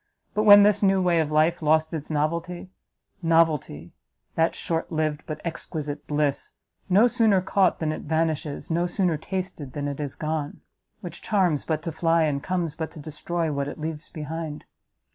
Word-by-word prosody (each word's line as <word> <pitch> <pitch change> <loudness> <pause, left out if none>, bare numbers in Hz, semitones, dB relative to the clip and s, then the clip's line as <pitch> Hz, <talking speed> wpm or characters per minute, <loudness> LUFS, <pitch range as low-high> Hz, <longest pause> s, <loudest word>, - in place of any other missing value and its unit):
But 215 +1 +1
when 205 -1 +10
this 205 0 +4
new 195 -1 +4
way 175 -2 +2
of 155 -2 0
life 155 +3 +2
lost 155 +1 +2
its 155 -2 -5
novelty, 170 +4 -2 0.5
novelty! 160 - +1 0.4
that 165 +1 +1
short 165 +1 -2
liv'd, 155 -1 -1
but 155 -1 -5
exquisite 150 -3 -5
bliss! 145 -2 -1 0.4
no 200 +5 +6
sooner 225 -5 +3
caught 185 0 +2
than 155 -1 -1
it - - -5
vanishes, 160 -1 -2
no 170 +2 +1
sooner 180 -2 0
tasted 180 -4 -5
than 145 -1 -3
it 140 0 -4
is 145 -3 -3
gone! 155 -1 -3 0.4
which 175 -1 -8
charms 180 -8 +1
but 155 -1 -2
to 165 - -3
fly, 165 +1 +2
and 145 -3 0
comes 175 -2 -2
but 160 0 -4
to - - -10
destroy 160 +2 -3
what 140 -1 -2
it 145 - -6
leaves 155 0 -5
behind! 155 0 -6
160 Hz, 175 wpm, -25 LUFS, 150-175 Hz, 0.5 s, when